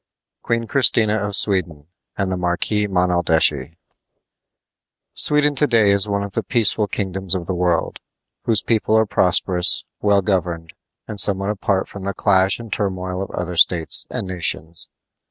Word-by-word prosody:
QUEEN 115 0 -2
CHRISTINA 110 -4 +2
OF 105 -2 -3
SWEDEN 85 -9 +1 0.3
AND 95 -1 -2
THE - - -1
MARQUIS 90 +4 -1
MONALDESCHI 85 -5 +1 1.4
Sweden 150 0 +2
to 145 +1 +1
day 110 -5 +3
is 100 +1 +4
one 100 -1 -2
of 100 - -7
the - - -2
peaceful 110 -3 +1
kingdoms 95 -2 -2
of 90 -2 -4
the 95 - -4
world, 90 -2 -1 0.5
whose 110 -3 +1
people 110 -1 0
are 110 - +2
prosperous, 90 -2 +2 0.2
well 100 -1 +2
governed, 85 -4 -3 0.3
and 105 - -7
somewhat 100 0 +2
apart 100 -2 -2
from 100 - -10
the 100 0 -4
clash 95 -1 +1
and 115 -3 -8
turmoil 95 -2 -4
of 95 - -6
other 90 0 -5
states 85 -1 +4
and - - -4
nations. 85 -2 -4
95 Hz, 155 wpm, -19 LUFS, 90-105 Hz, 1.4 s, is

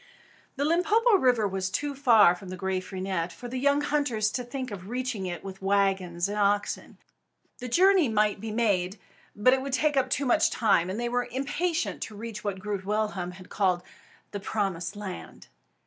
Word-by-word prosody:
The 285 +1 -1
Limpopo 410 +8 +4
River 250 - +3
was 190 -1 -2
too 290 +8 -2
far 235 -9 +6
from 180 +1 -10
Graaf 185 0 -3
Reinet 185 -2 -2
for 245 - -9
the 255 +1 -4
young 280 +2 +3
hunters 285 -8 0
to 250 - -3
think 255 0 -5
of 190 -1 -8
reaching 245 -5 -3
it 175 -2 -5
with 195 0 -8
wagons 190 -3 +1
and 205 +1 -3
oxen. 205 0 0 0.6
The 250 - -5
journey 365 +2 +4
might 210 -1 +1
be 225 - -5
made, 205 -4 0 0.4
but 230 +5 +4
it 265 - +1
would 275 0 -5
take 300 +2 +2
up 260 -1 +2
too 275 +2 0
much 245 - +3
time; 185 -6 +2
and 195 +4 -3
they 240 - -1
were 245 +1 -1
impatient 315 +7 -2
to 215 - -5
reach 215 0 -7
what 200 -2 -2
Groot 200 0 -4
Willem 200 -3 -2
had 185 0 -12
long - - -20
called 185 -3 +1 0.5
"The 205 - -4
Promised 195 -3 -2
Land." 205 -3 -8
215 Hz, 190 wpm, -27 LUFS, 190-260 Hz, 0.6 s, far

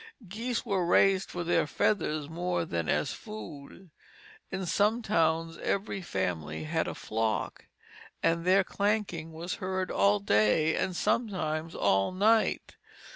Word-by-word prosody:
Geese 230 +6 -3
were 195 -5 0
raised 190 +2 +3
for 175 - -4
their 170 -2 +2
feathers 155 -4 0
more 175 +1 -2
than 85 - -3
as - - +1
food. 140 - -10 0.6
In 190 -1 -3
some 210 +6 +1
towns 165 -5 +1
every 200 0 -2
family 80 - -3
had 75 - -1
a - - -4
flock, 110 0 -2 0.6
and 165 0 +2
their 190 +2 +4
clanking 200 -6 -1
was 165 +3 -5
heard 185 0 -2
all 100 +1 +3
day 105 +10 +3
and 185 - -1
sometimes 175 -8 -1
all 95 - +2
night. 215 +4 +2
170 Hz, 130 wpm, -29 LUFS, 145-195 Hz, 0.6 s, their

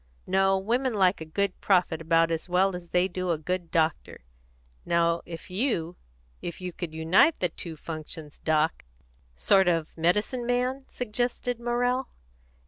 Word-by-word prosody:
No, 195 0 +3
women 235 +5 0
like 190 -3 +3
a - - -4
good 195 +4 -2
prophet 180 -4 +2
about 165 0 +3
as 165 +2 -3
well 185 +1 +2
as 175 -1 -8
they 180 +1 +3
do 185 0 -4
a 165 - +2
good 175 +2 -3
doctor. 160 - -1 0.6
Now 170 0 +2
if 165 +1 -9
you, 180 -6 0 0.5
if 170 - -5
you 180 -1 -5
could 170 -2 -5
unite 170 - +4
the 180 - +1
two 160 0 -7
functions, 155 -1 -8
Doc 155 0 +1 0.2
" - - -35
"Sort 185 - +4
of 165 -3 0
medicine 210 +9 +1
man?" 250 +2 0
suggested 245 +1 -2
Morrell. 245 +2 0
180 Hz, 155 wpm, -27 LUFS, 165-210 Hz, 0.6 s, unite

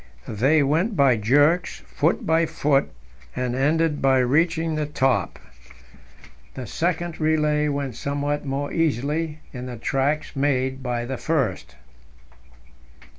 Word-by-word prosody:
They 135 +8 +2
went 165 +10 +1
by 135 -5 +4
jerks, 145 +11 +2
foot 160 +4 0
by 165 +1 +2
foot, 145 -3 +1 0.5
and 125 -1 -2
ended 150 +3 +1
by 135 -1 +4
reaching 160 +6 +1
the 155 -1 -2
top. 130 - 0 1.2
The 130 - -6
second 170 +3 -2
relay 150 -1 +1
went 140 -4 -3
somewhat 145 +2 -2
more 140 0 -3
easily 155 +1 -1
in 125 -1 -6
the 125 -1 -7
tracks 140 +7 -1
made 130 -1 0
by 120 -2 -2
the 130 +1 -4
first. 105 - -2
145 Hz, 125 wpm, -23 LUFS, 130-160 Hz, 1.2 s, by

